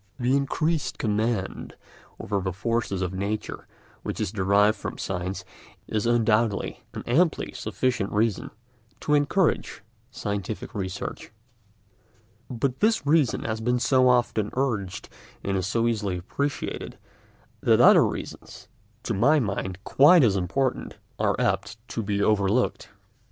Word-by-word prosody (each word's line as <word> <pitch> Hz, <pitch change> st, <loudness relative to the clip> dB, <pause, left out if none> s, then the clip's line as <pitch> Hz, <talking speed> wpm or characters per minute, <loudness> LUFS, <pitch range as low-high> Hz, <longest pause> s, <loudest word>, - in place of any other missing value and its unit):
The 125 Hz, +2 st, +2 dB
increased 155 Hz, +3 st, 0 dB
command 105 Hz, -2 st, -2 dB, 0.4 s
over 100 Hz, -1 st, -2 dB
the 95 Hz, 0 st, -2 dB
forces 100 Hz, 0 st, -1 dB
of 90 Hz, 0 st, -3 dB
nature 100 Hz, +3 st, -4 dB, 0.3 s
which -, -, -5 dB
is -, -, -1 dB
derived 100 Hz, +1 st, +3 dB
from -, -, -6 dB
science 95 Hz, 0 st, -4 dB, 0.4 s
is 110 Hz, +1 st, -1 dB
undoubtedly 115 Hz, -2 st, +1 dB
an -, -, -5 dB
amply 155 Hz, +7 st, +1 dB
sufficient 125 Hz, -6 st, -2 dB
reason 105 Hz, -1 st, 0 dB, 0.5 s
for 150 Hz, -, +1 dB
encouraging 150 Hz, -, +1 dB, 0.3 s
scientific 105 Hz, -4 st, -4 dB
research, 95 Hz, -1 st, -5 dB, 1.2 s
but 125 Hz, +1 st, -2 dB
this 220 Hz, -7 st, +2 dB
reason 145 Hz, -4 st, +2 dB
has 110 Hz, 0 st, -3 dB
been 125 Hz, +2 st, +1 dB
so 130 Hz, +1 st, +3 dB
often 120 Hz, -4 st, +2 dB
urged 110 Hz, -9 st, -2 dB, 0.4 s
and 100 Hz, -, -1 dB
is 95 Hz, -1 st, -1 dB
so 115 Hz, +2 st, +1 dB
easily 105 Hz, -5 st, -1 dB
appreciated 140 Hz, +11 st, -4 dB, 0.6 s
that -, -, +4 dB
other -, -, +8 dB
reasons, -, -, -6 dB, 0.3 s
to 115 Hz, -, -2 dB
my 135 Hz, +10 st, +4 dB
mind 95 Hz, -4 st, -3 dB
quite 150 Hz, +7 st, +6 dB
as 105 Hz, -5 st, +3 dB
important, 100 Hz, +9 st, -1 dB, 0.2 s
are -, -, +1 dB
apt 110 Hz, -, 0 dB
to 115 Hz, -, -3 dB
be 100 Hz, -1 st, -1 dB
overlooked. 105 Hz, +3 st, +1 dB
110 Hz, 130 wpm, -25 LUFS, 100-130 Hz, 1.2 s, other